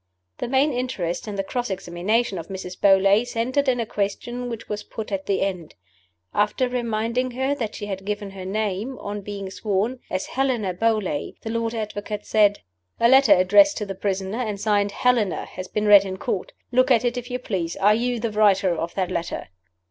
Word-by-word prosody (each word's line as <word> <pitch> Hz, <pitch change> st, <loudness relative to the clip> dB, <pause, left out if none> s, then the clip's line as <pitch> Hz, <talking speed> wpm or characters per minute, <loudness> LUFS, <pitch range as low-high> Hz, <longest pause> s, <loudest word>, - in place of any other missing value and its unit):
The -, -, -2 dB
main 270 Hz, +3 st, +2 dB
interest 225 Hz, -9 st, -3 dB
in 210 Hz, -, -4 dB
the 195 Hz, -, -1 dB
cross 245 Hz, +4 st, -3 dB
examination 190 Hz, +3 st, -1 dB
of 165 Hz, -, -8 dB
Mrs. 190 Hz, -2 st, -6 dB
Beauly 195 Hz, +2 st, +5 dB
centered 255 Hz, +4 st, -1 dB
in 250 Hz, -1 st, +1 dB
a 230 Hz, -, 0 dB
question 240 Hz, +5 st, -3 dB
which 230 Hz, -1 st, -6 dB
was 210 Hz, 0 st, -3 dB
put 220 Hz, -1 st, -7 dB
at 195 Hz, -1 st, -3 dB
the 200 Hz, -, +1 dB
end. 180 Hz, -5 st, -3 dB, 0.6 s
After 210 Hz, +5 st, +1 dB
reminding 235 Hz, 0 st, -1 dB
her 265 Hz, +2 st, +1 dB
that 230 Hz, -7 st, -4 dB
she 205 Hz, -, -5 dB
had 195 Hz, -2 st, -5 dB
given 205 Hz, 0 st, -4 dB
her 190 Hz, -1 st, -8 dB
name, 210 Hz, +5 st, -2 dB
on 205 Hz, 0 st, -5 dB
being 200 Hz, -1 st, -6 dB
sworn, 215 Hz, +5 st, -1 dB
as 185 Hz, -, -2 dB
"Helena 245 Hz, -8 st, 0 dB
Beauly," 205 Hz, -6 st, -1 dB
the 225 Hz, -, -5 dB
Lord 230 Hz, 0 st, -1 dB
Advocate 210 Hz, -1 st, -4 dB
said: 205 Hz, -1 st, +3 dB, 0.4 s
"A 235 Hz, -, +5 dB
letter 265 Hz, +2 st, +7 dB
addressed 205 Hz, +12 st, +5 dB
to 210 Hz, -, -2 dB
the 195 Hz, -, -4 dB
prisoner, 195 Hz, +2 st, -2 dB
and 215 Hz, -5 st, -2 dB
signed 205 Hz, -1 st, +1 dB
'Helena,' 235 Hz, -4 st, +1 dB
has 185 Hz, 0 st, -8 dB
been 210 Hz, +2 st, -2 dB
read 205 Hz, -2 st, +8 dB
in 190 Hz, -1 st, -5 dB
Court. -, -, -3 dB, 0.2 s
Look 255 Hz, +2 st, +3 dB
at 245 Hz, -2 st, +4 dB
it, 240 Hz, 0 st, +1 dB
if 245 Hz, 0 st, -5 dB
you 250 Hz, -, -2 dB
please. 185 Hz, -9 st, -3 dB
Are 205 Hz, +2 st, +4 dB
you 240 Hz, +2 st, 0 dB
the 225 Hz, 0 st, -2 dB
writer 200 Hz, -4 st, +3 dB
of 165 Hz, +1 st, -4 dB
that 185 Hz, -2 st, -1 dB
letter?" 170 Hz, 0 st, -3 dB
210 Hz, 200 wpm, -23 LUFS, 195-240 Hz, 0.6 s, read